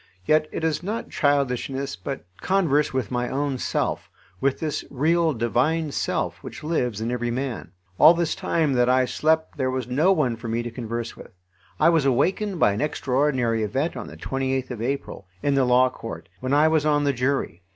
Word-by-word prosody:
Yet 155 0 +3
it - - -4
is 160 -1 0
not 210 +5 -4
childishness, 140 -1 0
but 135 -8 -6 0.2
converse 165 -7 +2
with 130 -1 -2
my 125 0 -1
own 140 -1 -1
self, - - -2 0.3
with 135 0 0
this 155 -2 -2
real 160 +4 +2
divine 145 +6 0
self - - -2
which - - -9
lives 125 -9 -1
in 115 +2 -2
every 120 -1 -1
man. 125 0 -3 0.3
All 160 +3 +8
this 170 -1 0
time 165 -6 0
that 125 -1 +3
I 130 0 +4
slept 160 +5 0
there 130 -2 0
was 130 -1 -2
no 150 +9 +3
one 135 -10 +1
for 115 +1 -7
me 115 +1 -1
to 120 - -5
converse 115 0 -5
with. - - -13 0.5
I - - +6
was 165 -3 +3
awakened 185 - +1
by 105 - +5
an 100 +2 -2
extraordinary 130 -5 0
event 135 +10 -1
on - - -6
the - - -11
28th 130 -1 -2
of 120 -3 -5
April, 125 -6 -4 0.2
in 145 - +2
the 135 -1 +3
Law 125 +1 +4
Court, 100 -10 -8
when 130 +1 -3
I 150 +2 +5
was 160 -2 +2
on 150 -1 +2
the 140 -1 +2
jury. 125 - -1
135 Hz, 195 wpm, -24 LUFS, 125-155 Hz, 0.5 s, All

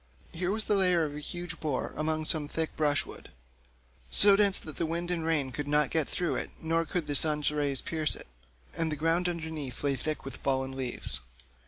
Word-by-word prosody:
Here 180 +2 -2
was 215 +2 +1
the 210 - 0
lair 180 -4 +3
of 145 - -5
a 150 - -6
huge 175 +2 -6
boar 150 -5 -2
among 155 0 -1
some 155 -2 0
thick 160 +1 -3
brushwood, 145 -2 -1 0.8
so 200 - +8
dense 200 -1 +6
that 155 - -5
the 165 - -1
wind 170 +2 -2
and 170 -2 -1
rain 150 -5 0
could 145 +3 -5
not 150 -1 +2
get 160 -2 +1
through 175 - -1
it, - - -3
nor 165 +1 0
could 170 0 -2
the 145 - -2
sun's 150 0 +4
rays 145 -3 0
pierce 155 -2 0
it, - - -9 0.5
and 165 -1 -1
the - - -1
ground 165 +4 +1
underneath 160 -7 -5
lay 140 -1 +1
thick 155 +2 -4
with 135 - -7
fallen 130 -1 -1
leaves. 125 - -3
155 Hz, 205 wpm, -29 LUFS, 145-170 Hz, 0.8 s, so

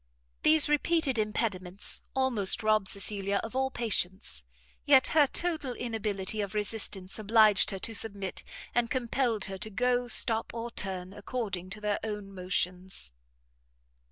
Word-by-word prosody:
These 310 -1 +5
repeated 295 -3 +1
impediments 200 -3 0
almost 245 -5 +2
robbed 215 -2 +2
Cecilia 200 0 -1
of 225 +3 -7
all 265 0 0
patience; 190 - 0 0.4
yet 270 -2 +5
her 300 -2 +4
total 315 -5 -2
inability 215 -4 -2
of 200 0 -5
resistance 205 -2 0
obliged 215 -2 +5
her 195 - -3
to 225 +4 -3
submit, 200 -3 -3 0.3
and 240 -1 +1
compelled 240 -4 -1
her 190 0 -7
to 215 - -2
go, 245 +3 0
stop, 225 -1 +3
or 230 +1 -5
turn, 190 -3 -4
according 205 -4 -5
to 210 +2 -8
their 210 -1 -1
own 210 -2 -5
motions. 180 - -3
215 Hz, 135 wpm, -29 LUFS, 195-245 Hz, 0.4 s, These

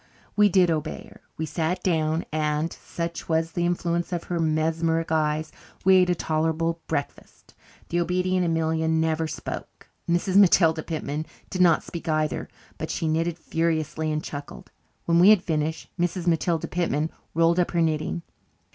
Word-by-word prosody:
We 210 0 +5
did 180 -2 +4
obey 155 -2 -3
her. - - -17 0.2
We 160 - -2
sat 170 +3 -2
down 160 -2 +1
and, 155 +1 0
such 170 0 -6
was 165 0 +1
the 175 +1 0
influence 175 0 -1
of 175 -2 -2
her 175 -1 -3
mesmeric 160 +1 0
eyes, 155 0 0 0.3
we 190 0 +7
ate 180 -1 +4
a 180 - +3
tolerable 165 +1 0
breakfast. 145 -3 -5 0.4
The 175 - 0
obedient 180 +1 +1
Amelia 160 -1 0
never 160 0 +1
spoke; - - -7 0.2
Mrs. 180 +3 +2
Matilda 170 -5 +5
Pitman 155 -1 -4 0.2
did 185 - -1
not 170 -3 +5
speak 170 -1 -6
either, 155 -1 0 0.3
but - - -4
she 165 - -2
knitted 165 +1 0
furiously 160 -1 -1
and 155 0 -2
chuckled. 145 -1 -8 0.3
When 170 0 +3
we 185 +4 +8
had 210 -4 +6
finished 155 -1 -2
Mrs. 175 0 -1
Matilda 165 -1 +1
Pitman 165 -3 -1 0.2
rolled 165 +1 +3
up 175 - +2
her 170 - +1
knitting. 160 +2 -1
165 Hz, 160 wpm, -25 LUFS, 155-175 Hz, 0.4 s, we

